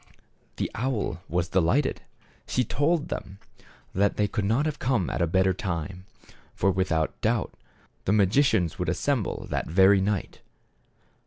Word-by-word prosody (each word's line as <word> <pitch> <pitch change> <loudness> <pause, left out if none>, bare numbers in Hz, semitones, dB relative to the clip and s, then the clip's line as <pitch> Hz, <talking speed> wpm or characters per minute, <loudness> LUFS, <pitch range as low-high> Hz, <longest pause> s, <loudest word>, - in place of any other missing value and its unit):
The - - -3
owl 120 -7 -2
was 85 0 -1
delighted. 95 - +1 0.5
She 125 - +1
told 150 +6 0
them 95 - -6 0.6
that 100 +2 +1
they 105 - +2
could 100 0 -2
not 115 +8 +2
have 150 -1 -2
come 120 -8 0
at - - -2
a 85 - +3
better 95 +3 +2
time. 90 +1 -4 0.5
For, 95 - +2
without 85 -4 -1
doubt, - - 0 0.5
the - - +1
magicians 100 - +3
would 90 -2 -1
assemble 120 - -1
that - - -1
very 95 +4 +5
night. 100 -1 -2
95 Hz, 145 wpm, -26 LUFS, 90-125 Hz, 0.6 s, very